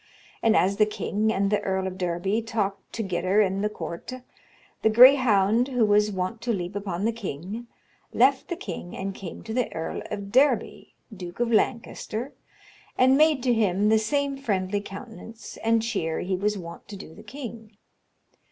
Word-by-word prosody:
And 225 -1 +4
as 195 +2 +2
the 215 0 +4
kynge 215 0 -1
and 200 -1 0
the 210 - +2
Erle 190 -1 -1
of 190 -1 -4
Derby 180 +5 0
talked 200 -3 -3
togyder 190 -2 0
in 190 +1 -2
the 210 - +1
courte, 210 +7 -7 0.6
the 220 - +4
grayhounde, 235 -2 +6
who 250 -4 +2
was 210 0 +3
wont 190 +4 -3
to 235 0 -1
leape 185 -2 -3
upon 195 -1 -3
the 230 - +2
kynge, 205 +2 -6 0.4
left 265 +2 +3
the 345 - -3
kynge 330 - -7
and 195 0 -4
came 190 -3 -8
to 220 - -6
the 250 0 0
Erle 160 0 -4
of 200 -1 -5
Derby, 270 +5 +1 0.2
duke 180 0 -8
of 240 -1 +1
Lancaster, 235 +1 -1 0.6
and 260 +1 +5
made 300 -3 +4
to 250 -2 +3
hym 205 -2 +2
the 220 0 +5
same 280 +5 -1
friendly 205 -6 -1
countenance 225 +2 -10
and 225 0 +1
chere 195 -9 -2
he 185 +1 -1
was 205 +3 0
wont 170 -2 -9
to 205 - -8
do 175 -4 -11
the 210 - -13
kynge. 225 -3 -9
210 Hz, 175 wpm, -26 LUFS, 190-235 Hz, 0.6 s, grayhounde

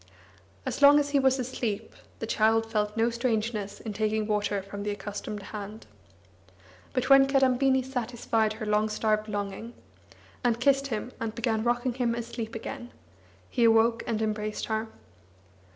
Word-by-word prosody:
As - - -3
long 285 +1 +9
as 285 -1 -1
he 285 - +4
was 265 0 +3
asleep, 240 -5 -3 0.2
the - - -4
child 225 0 +2
felt 210 0 -1
no 230 +1 +2
strangeness 220 -4 -2
in 220 - -6
taking 215 +1 0
water 205 -2 0
from 200 +1 -7
the 205 - -2
accustomed 205 0 -5
hand. 210 +1 -7 1.1
But 255 0 -1
when 275 0 +8
Kadambini 265 -1 +3
satisfied 235 -3 -1
her 215 0 -6
long 210 +1 +2
starved 215 0 0
longing, 205 +3 -4 0.7
and 235 -1 +2
kissed 275 +2 +3
him 235 0 -4
and 225 -1 -3
began 225 -2 0
rocking 240 +1 0
him 235 -2 0
asleep 230 -1 -5
again, 240 +2 -6 0.6
he 240 - 0
awoke 230 +1 +4
and 220 -1 0
embraced 215 0 -2
her. 220 0 -2
225 Hz, 150 wpm, -28 LUFS, 215-245 Hz, 1.1 s, long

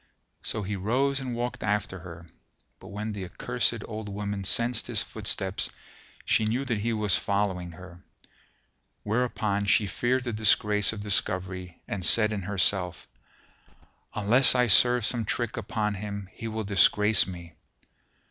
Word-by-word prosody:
So 110 - -2
he 100 +2 -3
rose 130 +8 0
and 130 -3 -5
walked 120 +1 -4
after 105 -2 -2
her; 85 -1 -11 0.5
but - - -13
when 105 +2 -5
the 100 -2 -6
accursed 90 - -2
old 110 -1 -6
woman 100 0 -4
sensed 115 +4 +1
his - - +1
footsteps, 95 0 -1 0.6
she 110 - +2
knew 120 +5 -1
that 115 -5 -2
he 115 +3 -1
was 105 -3 +2
following 95 -4 -2
her: 90 +1 -13 1.0
wherefore 110 -2 -1
she 105 0 +3
feared 125 +5 -1
the 120 -2 -4
disgrace 105 -1 +3
of 110 -2 -7
discovery 95 -3 0
and 95 -3 -4
said 110 +3 +5
in 100 - -3
herself, 90 -2 -1 1.1
"Unless 120 +6 +5
I 125 0 +4
serve 120 +2 +5
some 115 0 -1
trick 115 +2 -2
upon 105 -1 -2
him 100 -1 -6
he 115 - -7
will 110 0 -4
disgrace 105 +1 +4
me." 85 -3 -9
105 Hz, 145 wpm, -27 LUFS, 95-115 Hz, 1.1 s, said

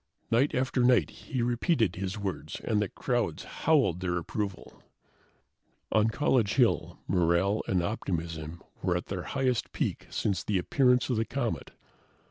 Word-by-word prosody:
Night 125 +6 +3
after 130 -1 +1
night, 125 -1 +4
he 130 -4 -4
repeated 120 - +1
his 95 +2 -3
words, 100 -3 -4
and 105 -1 +1
the 105 - -1
crowds - - -1
howled 140 - +2
their 90 -1 -1
approval. 95 +2 -5 1.1
On 110 0 +4
College 115 -3 +2
Hill, 125 -4 +2
morale 90 +3 +2
and 90 -2 +1
optimism 85 -4 -4 0.2
were 90 -1 +1
at 90 - -5
their 95 -2 -3
highest 130 +1 -1
peak - - -2
since 100 -3 -1
the 105 - 0
appearance 125 +7 +3
of 120 - +1
the 110 - +1
comet. 120 -1 -3
105 Hz, 145 wpm, -29 LUFS, 90-125 Hz, 1.1 s, night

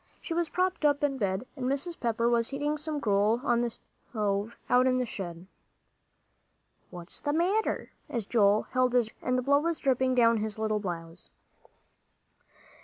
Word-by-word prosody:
She 335 - -5
was 340 -1 0
propped 365 -2 -1
up 290 -1 +3
in 275 -2 0
bed, 195 +2 -1
and 255 -3 -3
Mrs. 280 +6 -2
Pepper 230 -1 0
was 235 -1 +2
heating 290 +2 -1
some 305 0 -4
gruel 210 -1 +2
on 240 -3 +2
the 240 - 0
stove 210 -1 -4
out 250 +1 +4
in 255 0 +2
the 250 - 0
shed. 175 -5 -7 1.4
"What's 175 -1 -10
the 290 -1 -1
matter?" 375 +7 0 0.2
as 230 -4 -3
Joel 210 -1 +3
held 255 -1 0
his 240 -3 +3
arm - - -23
out, - - -12
and 250 0 +2
the - - +1
blood 285 +2 +3
was 335 -1 0
dripping 260 -1 +1
down 230 -2 +5
his 215 0 -2
little 215 -1 0
blouse. 170 -3 -6
245 Hz, 180 wpm, -29 LUFS, 215-285 Hz, 1.4 s, down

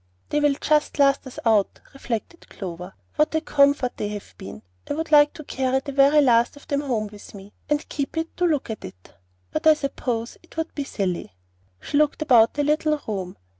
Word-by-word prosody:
"They 295 - +1
will 295 -1 +3
just 300 -1 +1
last 275 -1 +3
us 255 - -11
out," 215 -3 +2
reflected 270 +5 -6
Clover; 180 -1 -8 0.2
"what 305 +1 +2
a 315 - +2
comfort 280 -4 +2
they 210 - -2
have 205 - -8
been! 100 +3 -10 0.3
I - - -1
would 320 +1 -4
like 295 -1 +7
to 310 - -9
carry 265 -1 0
the 280 - -7
very 280 +2 +5
last 240 -2 +3
of 285 - -16
them 280 0 0
home 240 -7 -1
with 205 0 -13
me, 200 +1 -12 0.2
and 295 0 0
keep 285 +2 -4
it 325 0 -3
to 360 - +2
look 295 -8 -1
at; 215 - -7 0.7
but 315 +1 0
I 310 - +8
suppose 250 -5 -4
it 335 - -20
would 320 0 -3
be 285 - -4
silly." 180 - -3 0.4
She 285 - -2
looked 305 +1 +1
about 235 -6 +5
the 290 - +1
little 300 +1 +1
room. 190 -4 -4
275 Hz, 205 wpm, -23 LUFS, 220-300 Hz, 0.7 s, I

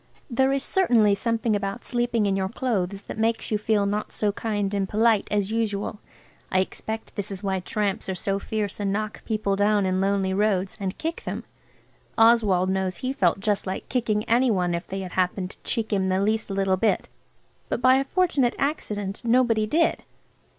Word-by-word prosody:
There 265 +2 +3
is 275 -1 0
certainly 235 - +3
something 225 +1 0
about 200 +3 -3
sleeping 240 -3 0
in 195 -1 +1
your 190 -1 -1
clothes 200 -5 -2
that - - -7
makes 225 +1 0
you 210 - +1
feel 210 -1 +1
not 205 +1 -2
so 210 -1 0
kind 205 -1 -2
and 195 -2 -1
polite 220 -1 +3
as 205 -1 0
usual. 210 -2 -2 0.5
I 185 - +3
expect 220 +4 -4
this 205 -2 -3
is 195 0 -6
why 190 -1 0
tramps 200 +1 -2
are 190 - -1
so 195 +2 -1
fierce 210 -1 -3
and 200 -1 0
knock 215 +1 -3
people 215 -3 0
down 205 0 +2
in 185 0 +1
lonely 195 -1 +1
roads 195 -2 +1
and 190 -2 -3
kick 325 +1 -4
them. - - -4 0.7
Oswald 215 -5 +4
knows 190 -1 -1
he 260 +1 -2
felt 190 -7 +1
just 205 -1 0
like 190 - -4
kicking 220 -5 0
any 245 +3 +3
one 180 -5 +1
if 170 +1 -3
they 195 +1 -4
had 185 -1 -6
happened 185 0 -1
to - - -17
cheek 225 -3 -1
him 190 -1 +1
the 185 0 +1
least 215 +2 0
little 195 -1 +1
bit. 220 +3 +1 0.6
But - - -1
by 255 +1 +5
a 270 - +2
fortunate 285 -6 +1
accident 210 -9 -2
nobody 230 -2 +3
did. 325 +8 +2
210 Hz, 190 wpm, -25 LUFS, 195-230 Hz, 0.7 s, by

